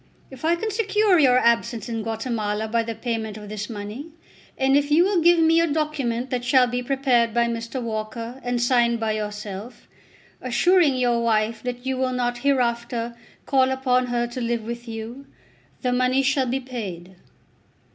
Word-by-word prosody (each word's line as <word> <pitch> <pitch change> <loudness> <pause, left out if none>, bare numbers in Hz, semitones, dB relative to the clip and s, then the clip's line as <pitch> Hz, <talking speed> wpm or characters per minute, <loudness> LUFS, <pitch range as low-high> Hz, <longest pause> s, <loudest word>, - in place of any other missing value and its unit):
If 265 +1 -12
I 330 +2 +3
can 435 +6 -3
secure 420 -3 +2
your 255 -4 +5
absence 235 -2 +1
in 230 -2 -3
Guatemala 220 -1 -2
by 230 +1 +1
the 230 0 -5
payment 225 -2 -3
of 210 -1 -10
this 210 0 -5
money, 215 +6 -6 0.5
and 270 0 +3
if 285 0 +2
you 310 +4 +5
will 380 -2 +2
give 345 +1 +5
me 325 0 +4
a 335 - +2
document 275 -5 -2
that 250 -1 -1
shall 255 0 +4
be 245 0 -2
prepared 245 -3 +1
by 235 0 +3
Mr. 230 +2 -4
Walker 230 +2 -5
and 245 0 -1
signed 240 -1 +2
by 220 -1 0
yourself, 210 +1 -6 0.5
assuring 300 +4 +3
your 240 -2 +1
wife 220 -1 +1
that 245 0 -5
you 265 0 -1
will 255 0 0
not 245 -1 -1
hereafter 235 -3 0 0.3
call 265 -1 +3
upon 255 -1 +1
her 240 -1 0
to 240 +1 -6
live 235 -1 -1
with 235 +2 -6
you, 230 +5 -7 0.6
the 250 -1 +1
money 255 +2 +2
shall 270 -1 +1
be 260 +2 -1
paid." 190 -9 -7
245 Hz, 175 wpm, -23 LUFS, 230-265 Hz, 0.6 s, your